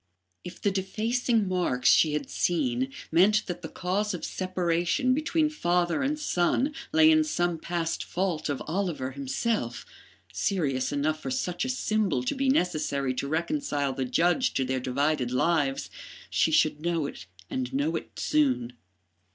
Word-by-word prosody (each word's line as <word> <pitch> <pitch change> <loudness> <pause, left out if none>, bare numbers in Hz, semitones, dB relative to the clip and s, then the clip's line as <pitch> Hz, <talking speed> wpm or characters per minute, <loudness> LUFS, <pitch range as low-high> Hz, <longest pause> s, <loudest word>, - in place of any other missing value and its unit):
If 180 0 -9
the 200 - +1
defacing 220 +3 0
marks 175 -9 0
she 155 -2 +5
had 150 - -2
seen 130 -6 0 0.2
meant 200 +6 +4
that 175 -1 -5
the 160 - -6
cause 195 +3 -1
of 175 - -5
separation 185 - 0
between 310 +2 +1
father 175 - 0
and 285 +3 0
son 265 - +1 0.2
lay 315 0 +6
in 315 0 +5
some 175 - -1
past 170 0 -2
fault 175 -4 -2
of 140 - -2
Oliver 165 -6 -2
himself, 140 - -2 0.5
serious 140 - 0
enough 150 +2 0
for 135 - -4
such 175 - -2
a - - -2
symbol 215 - 0
to 125 - -1
be 270 0 0
necessary 155 - +1
to 135 +2 -3
reconcile 160 - -1
the 130 0 -2
judge 175 - +2
to 130 - +1
their 130 0 -1
divided 130 +1 0
lives, 135 +1 0 0.4
she - - +3
should 150 - +3
know 170 -2 0
it 90 -10 -8 0.2
and 125 +4 -3
know 145 +5 0
it - - -6
soon. 265 - +1
175 Hz, 155 wpm, -27 LUFS, 140-210 Hz, 0.5 s, lay